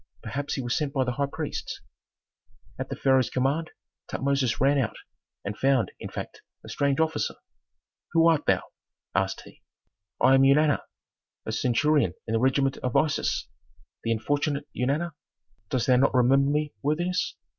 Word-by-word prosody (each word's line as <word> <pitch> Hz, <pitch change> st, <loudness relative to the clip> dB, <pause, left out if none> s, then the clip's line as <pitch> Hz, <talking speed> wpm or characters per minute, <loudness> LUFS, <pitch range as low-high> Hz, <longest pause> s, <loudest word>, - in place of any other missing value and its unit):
Perhaps 145 Hz, +1 st, -3 dB
he 135 Hz, -, -3 dB
was 120 Hz, +1 st, -1 dB
sent 145 Hz, -2 st, -1 dB
by 135 Hz, -3 st, +2 dB
the 125 Hz, -, -1 dB
high 140 Hz, +3 st, -1 dB
priests." 155 Hz, +1 st, -5 dB, 1.0 s
At -, -, -4 dB
the -, -, -3 dB
pharaoh's 130 Hz, -2 st, +3 dB
command 140 Hz, +5 st, 0 dB, 0.4 s
Tutmosis 135 Hz, -4 st, 0 dB
ran 140 Hz, +2 st, +3 dB
out, 115 Hz, -, -1 dB, 0.5 s
and 100 Hz, +1 st, -3 dB
found, 135 Hz, -1 st, +2 dB
in -, -, -6 dB
fact, -, -, -7 dB, 0.2 s
a -, -, -9 dB
strange 140 Hz, 0 st, 0 dB
officer. 160 Hz, -2 st, 0 dB, 0.8 s
"Who 165 Hz, 0 st, +5 dB
art 160 Hz, -3 st, +2 dB
thou?" -, -, +3 dB, 0.5 s
asked -, -, 0 dB
he. -, -, -16 dB, 0.6 s
"I 130 Hz, -, +5 dB
am 135 Hz, -, +6 dB
Eunana, 145 Hz, +2 st, +4 dB, 0.7 s
a -, -, -3 dB
centurion 125 Hz, -, +2 dB
in 110 Hz, -, -3 dB
the 115 Hz, -, +2 dB
regiment 135 Hz, +2 st, +2 dB
of 125 Hz, -2 st, -3 dB
Isis. 155 Hz, -1 st, +1 dB, 0.6 s
The 115 Hz, -, 0 dB
unfortunate 145 Hz, +5 st, -1 dB
Eunana. 145 Hz, +7 st, -1 dB, 0.6 s
Dost 125 Hz, -3 st, 0 dB
thou 125 Hz, -1 st, +4 dB
not 135 Hz, +1 st, +3 dB
remember 135 Hz, +3 st, +4 dB
me, 150 Hz, +1 st, 0 dB
worthiness? 175 Hz, +5 st, 0 dB
140 Hz, 155 wpm, -26 LUFS, 130-150 Hz, 1.0 s, am